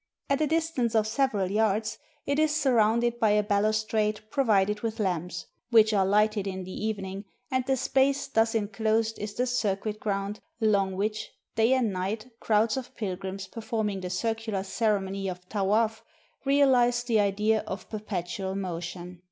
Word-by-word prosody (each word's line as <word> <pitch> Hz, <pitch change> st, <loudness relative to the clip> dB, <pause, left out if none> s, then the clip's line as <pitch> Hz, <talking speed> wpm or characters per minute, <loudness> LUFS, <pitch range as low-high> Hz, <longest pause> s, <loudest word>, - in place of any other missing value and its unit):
At 275 Hz, +2 st, +2 dB
a 305 Hz, -, +3 dB
distance 315 Hz, -7 st, 0 dB
of 215 Hz, -1 st, +4 dB
several 215 Hz, -5 st, 0 dB
yards 215 Hz, 0 st, +1 dB, 0.3 s
it 280 Hz, +1 st, 0 dB
is 310 Hz, -1 st, +2 dB
surrounded 240 Hz, -4 st, +2 dB
by 220 Hz, -, +4 dB
a 210 Hz, 0 st, +3 dB
balus 215 Hz, +1 st, +1 dB
trade 215 Hz, -1 st, 0 dB
provided 210 Hz, -6 st, +2 dB
with 225 Hz, -1 st, -3 dB
lamps, 175 Hz, -4 st, -2 dB, 0.2 s
which 220 Hz, -2 st, +5 dB
are 195 Hz, -2 st, +3 dB
lighted 210 Hz, 0 st, +2 dB
in 190 Hz, -1 st, -4 dB
the 185 Hz, -, -8 dB
even 210 Hz, -1 st, -3 dB
ing, 195 Hz, +2 st, -6 dB, 0.3 s
and 260 Hz, 0 st, +1 dB
the 265 Hz, -1 st, +2 dB
space 275 Hz, +2 st, +2 dB
thus 225 Hz, -4 st, +1 dB
inclosed 220 Hz, +1 st, 0 dB
is 210 Hz, 0 st, -5 dB
the 250 Hz, -, +1 dB
circuit 215 Hz, -3 st, -1 dB
ground 200 Hz, 0 st, -2 dB, 0.2 s
along 200 Hz, -4 st, +2 dB
which, 215 Hz, +2 st, -2 dB, 0.3 s
day 225 Hz, +3 st, +4 dB
and 240 Hz, -6 st, +1 dB
night, 210 Hz, +6 st, -3 dB
crowds 220 Hz, +2 st, +2 dB
of 260 Hz, -, -6 dB
pilgrims, 190 Hz, -1 st, -4 dB
per 225 Hz, +4 st, -9 dB
forming 215 Hz, -3 st, -2 dB
the 180 Hz, -, -4 dB
circular 220 Hz, +1 st, -2 dB
ceremony 195 Hz, -2 st, -1 dB
of 180 Hz, -1 st, -6 dB
Tawaf, 215 Hz, +2 st, +1 dB, 0.4 s
reahze 250 Hz, -4 st, +4 dB
the 230 Hz, -3 st, +2 dB
idea 210 Hz, +2 st, +2 dB
of 190 Hz, -1 st, -6 dB
perpetual 190 Hz, -3 st, -4 dB
motion. 180 Hz, -1 st, -5 dB
215 Hz, 165 wpm, -27 LUFS, 195-230 Hz, 0.4 s, which